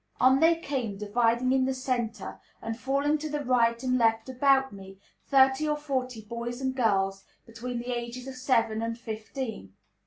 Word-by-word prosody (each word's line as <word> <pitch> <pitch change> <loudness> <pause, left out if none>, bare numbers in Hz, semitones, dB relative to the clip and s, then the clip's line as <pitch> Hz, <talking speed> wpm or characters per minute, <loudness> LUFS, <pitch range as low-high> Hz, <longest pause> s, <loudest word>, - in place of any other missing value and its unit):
On 260 +2 +5
they 330 +2 +5
came, 265 -10 -3
dividing 235 +4 +1
in 260 0 +3
the 265 0 -1
centre, 240 -5 -3 0.2
and 225 0 -4
falling 280 +5 0
to 310 +1 -4
the 295 -1 -3
right 235 -1 +2
and 255 0 +1
left 225 +1 +2
about 265 0 +3
me, 195 -1 -11 0.3
thirty 270 +2 +4
or 300 - +1
forty 255 -6 -3
boys 235 +2 -5
and 265 -1 -1
girls, 195 -5 +1 0.2
between 235 +2 -6
the 245 +1 -3
ages 240 +1 -5
of 270 - -6
seven 230 -4 +1
and 230 0 -3
fifteen. 220 - -6
245 Hz, 175 wpm, -28 LUFS, 225-265 Hz, 0.3 s, On